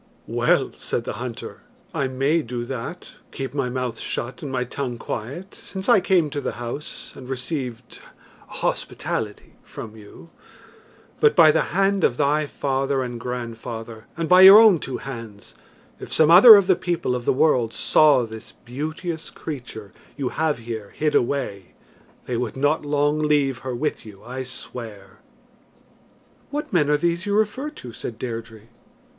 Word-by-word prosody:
"Well," - - +1
said - - -4
the - - -4
hunter, 125 -3 -7 0.3
"I 135 - 0
may 135 +6 +1
do 120 -3 -5
that 120 -2 -6 0.2
keep 135 -2 -5
my 135 -3 -1
mouth 125 -2 -3
shut 120 +2 -4
and 145 - -5
my 125 -1 -1
tongue 125 -1 -4
quiet, 135 - -6
since 190 -1 -8
I - - +6
came 175 -5 +2
to 145 - -3
the - - -3
house 120 +5 -7
and 130 -1 -11
received 125 -2 -5 0.5
hospitality 105 -2 -4
from 110 -1 -10
you; 110 +10 -14 0.9
but 450 -1 +4
by 155 -2 +7
the - - +1
hand 195 -1 +2
of 120 - +2
thy 150 +1 +1
father 135 -1 -1
and 120 -1 -6
grandfather, 115 -2 -6
and 165 -1 -2
by 180 +2 +7
your 195 +2 +11
own 215 -7 +6
two 130 -3 -5
hands, 115 -6 -9 0.5
if - - -9
some 160 0 +4
other 215 +6 +11
of 200 -2 +4
the 185 -1 +4
people 170 -7 -2
of 120 -1 -5
the - - +3
world 130 -5 +2
saw 145 -2 +4
this 110 -1 -10
beauteous 155 +6 -6
creature 120 - -8 0.2
you 135 -3 -2
have 160 -2 0
here 115 -3 -7
hid 155 -1 0
away, 110 -8 -1 0.5
they 125 - -2
would 120 0 -3
not 145 +4 +1
long 145 +1 +1
leave 145 -4 +1
her 130 0 -5
with 150 +5 -2
you, 105 -3 -13
I 130 +2 -5
swear." 115 -6 -8 1.3
"What 300 -2 -5
men 150 -5 +3
are 150 - +4
these 170 +4 -1
you 200 - +1
refer 220 +7 0
to?" 125 - -11
said 115 - -7
Deirdre. 115 -2 -6
135 Hz, 160 wpm, -23 LUFS, 120-155 Hz, 1.3 s, your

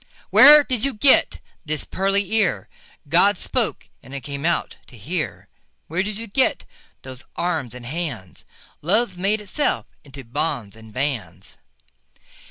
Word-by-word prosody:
Where 295 +1 +9
did 250 -5 -2
you 275 -3 0
get 260 +5 +4 0.2
this 155 -2 -3
pearly 195 +1 -1
ear? 180 - +1 0.4
God - - +4
spoke, - - -2
and 135 - -11
it 140 - -5
came 140 +4 -4
out 170 - -1
to 125 - -15
hear. 135 - -4 0.4
Where 170 +4 0
did 205 +1 -3
you 230 - -6
get 245 +5 0 0.4
those 130 -1 -9
arms 160 -9 -2
and 125 -1 -10
hands? 130 - -6 0.4
Love 200 +5 +1
made 200 +4 0
itself 210 +9 -1 0.2
into 135 -1 -11
bonds 120 -5 -3
and 110 0 -14
bands. 130 -1 -4
165 Hz, 145 wpm, -22 LUFS, 130-205 Hz, 0.4 s, Where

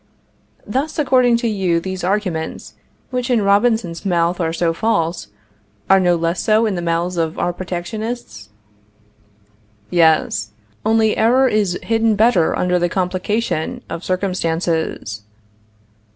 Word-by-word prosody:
Thus, 275 +8 -2
according 255 -5 +3
to 235 0 -1
you, 190 -6 +1
these 190 +1 -5
arguments, 185 -4 -2 0.4
which 250 0 -2
in 235 -4 +2
Robinson's 200 -4 +1
mouth 175 -2 +1
are 165 -2 0
so 165 0 0
false, 170 -4 -1 0.6
are 195 - +7
no 175 -2 +3
less 170 +1 -1
so 220 +1 +3
in 215 - 0
the 175 - -3
mouths 170 +1 -1
of 160 -1 -1
our 175 - -1
protectionists? 180 - -6 1.4
Yes; 155 - +2 0.3
only 220 0 +2
error 250 +4 +4
is 205 -6 +1
hidden 225 -1 +2
better 205 -6 +3
under 180 0 +1
the 175 0 +1
complication 185 0 -2
of 165 - -5
circumstances. 165 - -2
185 Hz, 125 wpm, -19 LUFS, 170-220 Hz, 1.4 s, are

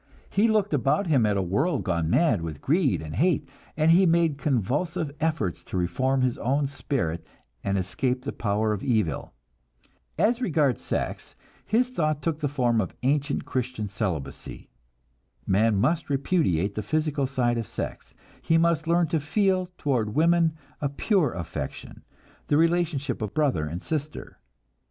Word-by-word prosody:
He 210 +3 +3
looked 210 -5 +1
about 140 - +2
him 135 -10 +3
at 105 -1 +1
a 95 - +1
world 140 - 0
gone 85 -4 0
mad 135 - +3
with 80 -3 -5
greed 145 - +1
and 75 -1 -6
hate, 160 -3 +2 0.3
and 160 +1 +4
he 185 +2 +6
made 165 -3 +2
convulsive 145 - -1
efforts 155 - -1
to - - -4
reform 130 +10 +1
his 125 -1 0
own 140 +4 +1
spirit 125 - -3 0.4
and 100 0 0
escape 125 +8 -1
the 140 - -3
power 105 0 0
of 100 - -4
evil. 105 - 0 0.9
As 240 +2 +2
regards 150 - +1
sex, - - -4 0.3
his 245 +4 +2
thought 155 - -1
took 160 -2 -1
the 150 - 0
form 125 -5 +1
of 95 - -5
ancient 145 +2 0
Christian 125 -5 -3
celibacy. 95 - -5 0.7
Man 105 +3 +3
must 150 - +1
repudiate 135 - +1
the 110 - -3
physical 150 +3 0
side 120 -3 0
of 115 - -4
sex, - - -6 0.3
he 165 - +2
must 165 -1 +2
learn 170 +1 +3
to 160 - +1
feel 185 +4 +1
toward 120 -7 -1
women 165 +1 +3 0.3
a 145 - 0
"pure" 155 - +1
affection, 80 -5 -6 0.4
the 145 - +3
relationship 160 -6 +1
of 105 -2 -4
brother 135 - +1
and 85 +4 -6
sister. 150 -1 -5
140 Hz, 155 wpm, -26 LUFS, 105-160 Hz, 0.9 s, he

